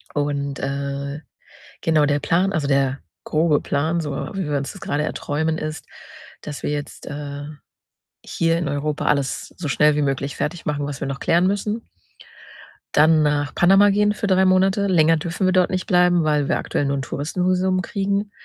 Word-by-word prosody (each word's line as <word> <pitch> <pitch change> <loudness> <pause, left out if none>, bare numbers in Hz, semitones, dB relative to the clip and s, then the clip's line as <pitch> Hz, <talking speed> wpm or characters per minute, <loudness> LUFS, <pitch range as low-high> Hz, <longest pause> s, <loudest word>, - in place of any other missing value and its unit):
Und, 140 -1 -2
äh, 140 +1 -4 0.6
genau 155 -2 +3
der 145 0 +1
Plan 175 +6 +1
also, 145 -3 -1
der 135 -1 +1 0.2
grobe 155 -1 +2
Plan, 160 +4 0
so 150 -2 -4 0.2
wie 185 -6 -3
wir 145 - +1
uns 140 0 -4
das 195 - -13
grade 145 +1 -1
erträumen, 160 +1 -2
ist, 155 0 -5 0.6
dass 145 -1 -7
wir - - -1
jetzt, 145 -1 -6
äh, 145 -1 -6 0.8
hier 165 0 0
in 170 -3 -2
Europa 145 +1 -2
alles 140 -2 -1
so 165 -5 -4
schnell 150 +2 +3
wie 150 - +1
möglich 140 0 -1
fertigmachen, 150 -3 -3
was 145 -1 -6
wir 140 - -3
noch 135 0 -4
klären 170 +2 +2
müssen. 210 +3 -2 1.1
Dann 155 +1 +5
nach 145 -1 0
Panama 195 +3 +5
gehen 210 +1 +2
für 210 - -4
3 190 0 +4
Monate. 190 +2 +3
Länger 165 -3 +4
dürfen 175 +4 -2
wir 185 - +3
dort 185 -1 +3
nicht 185 -1 -2
bleiben, 180 -2 +3
weil 150 -2 +1
wir - - +2
aktuell 145 - -2
nur 140 0 0
'n 135 - -3
Touristenvisum 185 +6 0
kriegen. 200 +2 -2
155 Hz, 180 wpm, -22 LUFS, 145-185 Hz, 1.1 s, Dann